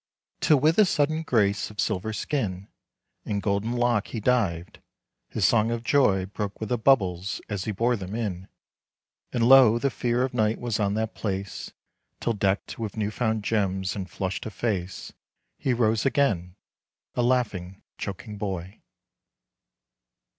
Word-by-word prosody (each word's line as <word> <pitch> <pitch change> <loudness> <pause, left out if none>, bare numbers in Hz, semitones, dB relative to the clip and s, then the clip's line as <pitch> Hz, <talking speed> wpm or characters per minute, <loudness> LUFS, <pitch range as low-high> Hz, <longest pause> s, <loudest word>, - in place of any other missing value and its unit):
Till 150 -3 +4
with 155 +7 +3
a 215 - +8
sudden 155 -2 +1
grace 105 -9 +1
of 105 - -13
silver 105 0 0
skin 105 -6 -2 0.6
And 100 -1 -2
golden 100 +3 -1
lock 120 -3 +1
he 115 - -4
dived, 100 -8 0 0.5
his - - 0
song 115 -1 +4
of 115 0 -2
joy 105 -8 +3
Broke 100 +1 -5
with 110 - -4
the 125 - +1
bubbles 95 -7 +2
as 100 -2 -3
he 110 - -1
bore 115 +5 +1
them 100 -1 -6
in; 95 -5 -3 0.8
And 115 -1 +2
lo, 125 -4 +8
the 140 +3 0
fear 120 +1 0
of 130 - -2
night 110 -2 +1
was 120 -3 -2
on 100 -1 +1
that 110 0 -2
place, 100 -2 -4 0.5
Till 115 - 0
decked 100 0 -1
with 110 -2 -4
new 105 -1 -1
found 110 -2 -1
gems 95 -3 0
and 95 -2 -5
flushed 95 +4 -3
of 110 - -8
face, 95 -5 -3 0.5
He 135 - 0
rose 115 -2 +2
again, 105 -11 +1 0.6
a - - 0
laughing, 105 -7 0 0.2
choking 105 +1 -6
boy. 95 -2 -5
110 Hz, 155 wpm, -26 LUFS, 100-120 Hz, 0.8 s, a